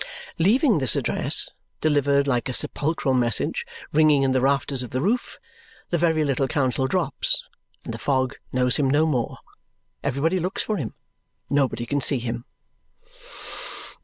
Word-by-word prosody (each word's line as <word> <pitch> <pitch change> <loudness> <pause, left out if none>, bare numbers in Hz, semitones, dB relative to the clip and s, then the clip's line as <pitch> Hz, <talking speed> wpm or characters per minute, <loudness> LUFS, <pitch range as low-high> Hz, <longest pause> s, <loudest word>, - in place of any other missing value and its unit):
Leaving 220 - +4
this 130 -3 +2
address - - +2 0.3
(delivered 140 -2 +2
like 125 -2 0
a 125 - -3
sepulchral 145 -3 0
message) 120 -3 0 0.3
ringing 150 -2 +4
in 135 - +2
the 130 -1 +2
rafters 135 0 +1
of 125 - -5
the 130 - -2
roof, 220 - -1 0.5
the 175 - +2
very 160 -2 +2
little 135 -2 0
counsel 130 -1 +1
drops, - - +1 0.4
and - - -5
the - - -7
fog 130 -2 0 0.2
knows 125 0 +3
him 140 -3 +2
no 150 +3 +3
more. 130 -7 -1 0.7
Everybody 165 +8 0
looks 180 +3 -2
for 215 - -2
him. 130 - -5 0.6
Nobody 135 -4 +1
can 145 +3 -1
see 135 +2 +3
him. 120 0 -4
140 Hz, 150 wpm, -24 LUFS, 130-155 Hz, 0.7 s, Leaving